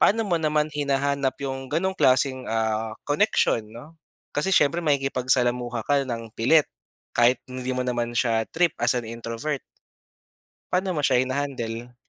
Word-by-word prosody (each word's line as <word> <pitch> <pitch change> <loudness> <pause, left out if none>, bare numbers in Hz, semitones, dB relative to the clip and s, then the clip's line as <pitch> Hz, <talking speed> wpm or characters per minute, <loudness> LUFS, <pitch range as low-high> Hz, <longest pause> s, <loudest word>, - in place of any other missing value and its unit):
Paano 225 +3 +4
mo 175 - +2
naman 150 -1 +1
hinahanap 140 -1 0
'yong 135 -1 -4
gano'n 190 +3 0
klaseng, 130 -2 +2
ah, 110 0 -1 0.2
connection 145 - +2
'no? 125 +9 -12 0.4
Kasi 190 +6 +1
siyempre 165 0 +4
makikipagsalamuha 125 -4 +1
ka 145 -1 +3
nang 115 -2 -4
pilit, 150 +7 +4 0.5
kahit 120 +1 +4
hindi 130 0 -4
mo 125 - -2
naman 120 -1 -1
siya 115 -2 +2
trip 170 -1 +2
as 120 +1 +3
an 120 - -2
introvert. 115 +5 -4 1.1
Paano 185 0 0
mo 150 - 0
siya 130 -2 +3
hina-handle? 125 -3 -4
130 Hz, 145 wpm, -25 LUFS, 120-145 Hz, 1.1 s, Paano